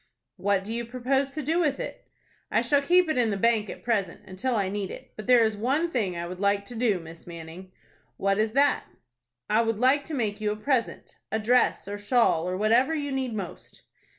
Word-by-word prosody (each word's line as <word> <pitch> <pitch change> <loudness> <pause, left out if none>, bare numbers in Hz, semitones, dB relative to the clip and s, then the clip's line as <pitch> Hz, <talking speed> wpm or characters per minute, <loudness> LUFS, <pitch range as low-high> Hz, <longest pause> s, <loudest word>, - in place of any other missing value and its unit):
"What 200 -1 +1
do 215 +3 -5
you 235 +1 -2
propose 265 +3 -1
to 305 - -3
do 320 +5 +1
with 295 -5 +1
it?" - - -7 0.4
"I - - +2
shall 285 -2 +3
keep 355 +4 +4
it 310 -5 0
in 235 -2 +3
the 200 - -1
bank 220 0 +2
at - - -8
present, 205 -7 -1
until 235 +7 -2
I 200 -3 +1
need 195 -1 -3
it. - - -10
But 215 - -8
there 245 -2 +6
is 220 -1 +1
one 275 +10 0
thing 200 - -1
I 170 - -3
would 180 +1 -7
like 200 0 +1
to 240 - -8
do, 220 -5 +1
Miss 165 0 -12
Manning." 170 +2 -10 0.5
"What 195 +1 +1
is 220 0 +1
that?" 285 +2 +3 0.6
"I 220 +2 +3
would 225 -2 0
like 260 +5 +3
to 320 - -5
make 215 -4 -2
you 210 -1 0
a - - -2
present,—a 230 -1 -2
dress, 235 -1 +2
or 205 0 -5
shawl, 205 -6 +2
or 185 - -2
whatever 235 +9 +3
you 290 -2 -3
need 260 -4 -2
most." 190 -5 -8
225 Hz, 220 wpm, -26 LUFS, 200-260 Hz, 0.6 s, there